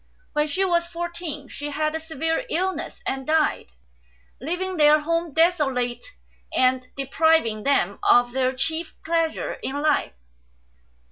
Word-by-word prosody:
When 300 0 +1
she 375 +6 0
was 340 -2 +1
four 345 0 -4
teen 320 -5 -7
she 290 +3 -6
had 305 +1 -1
a 320 - -2
severe 320 - -2
illness 375 +1 -2
and 265 -1 -3
died, 315 0 +1 0.7
leaving 360 +6 -3
their 300 0 +6
home 335 +1 -1
desolate 275 -7 +1 0.5
and 255 0 +2
depriving 275 -5 +2
them 210 -7 +1
of 245 0 +4
their 260 -1 +1
chief 320 +5 -2
pleasure 330 -1 -1
in 280 +2 -3
life. 300 - +1
310 Hz, 135 wpm, -24 LUFS, 270-335 Hz, 0.7 s, their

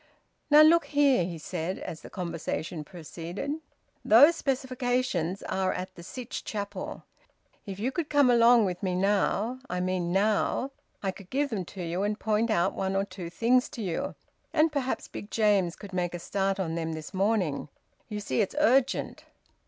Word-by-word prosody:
"Now 300 +1 +9
look 335 +2 +6
here!" 285 - +3
he 170 -2 -5
said, 170 +3 -4
as 160 - -7
the - - -11
conversation 170 -2 -4
proceeded, 175 - -6 0.5
"those 285 +10 +7
specifications 250 - -1
are 190 0 0
at 185 +1 -5
the 170 - -12
Sytch 235 +7 -6
Chapel. 205 -2 -5 0.6
If 195 -1 -5
you 235 +6 -1
could 325 +1 -3
come 290 -2 +5
along 235 -1 +6
with 180 -2 -3
me 185 -2 -1
now 205 +5 +1
I 180 - -2
mean 180 -1 -1
now 210 +7 +1 0.3
I 195 - 0
could 190 -1 -14
give 280 +1 0
them 195 -5 -2
to 185 +2 -7
you 170 +2 -2
and 210 +1 -1
point 220 +1 +1
out 190 -3 +2
one 190 0 -2
or 195 +1 +1
two 185 -3 -7
things 245 +7 +2
to 230 - -6
you, 175 -4 -3 0.4
and 320 0 +3
perhaps 275 -3 -2
Big 205 - -8
James 205 -6 +2
could 200 -2 -11
make 175 -1 -1
a - - -2
start 195 +2 -1
on 165 -4 -1
them 165 -1 -2
this 155 +3 -7
morning. 190 -8 0 0.4
You 210 -1 -4
see 205 - 0
it's 205 - -2
urgent." 270 -3 +2
200 Hz, 175 wpm, -28 LUFS, 180-250 Hz, 0.6 s, Now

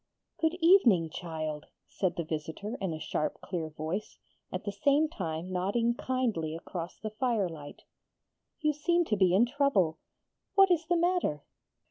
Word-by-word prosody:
'Good 320 +1 +1
evening, 235 - +5
child,' 155 -3 -5 0.2
said 185 -3 -1
the 170 - -2
visitor 160 +8 -4
in 190 -3 -1
a 160 - -3
sharp 150 - -2
clear 165 -4 -4
voice, 160 +7 -4 0.3
at 185 - -4
the 205 - -2
same 280 +9 +3
time 175 - -4
nodding 205 +6 +1
kindly 235 -12 -1
across 170 +1 -6
the 215 - -5
firelight. 200 - -2 0.8
'You 305 0 +2
seem 345 +4 +2
to 215 - +1
be 185 -2 +4
in 220 +5 +6
trouble. 245 - +1 0.6
What 390 -1 +6
is 335 -2 +2
the 350 0 +3
matter?' 345 - +1
200 Hz, 150 wpm, -30 LUFS, -, 0.8 s, in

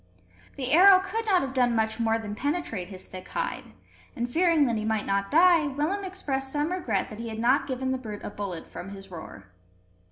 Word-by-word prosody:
The 260 -2 -3
arrow 370 +4 +8
could 440 +4 -4
not 375 -6 +4
have 265 -1 -4
done 245 -3 +2
much 220 0 0
more 225 -1 +2
than 215 -2 -6
penetrate 275 - -2
his 185 -1 -9
thick 185 -1 -10
hide; - - -3 0.5
and, 240 0 -2
fearing 330 +2 +3
that 235 -3 0
he 215 - -2
might 220 -1 0
not 200 0 0
die, 335 -1 +5
Willem 300 +9 -1
expressed 275 -8 -3
some 295 +3 -1
regret 240 - -1
that 215 - -8
he 230 0 -5
had 220 - -6
not 260 +5 +2
given 260 -1 -2
the 260 - -1
brute 215 -4 -7
a - - -5
bullet 195 -6 -6
from 180 - -8
his 195 -1 -10
roer. 100 - -10
255 Hz, 215 wpm, -27 LUFS, 215-320 Hz, 0.5 s, arrow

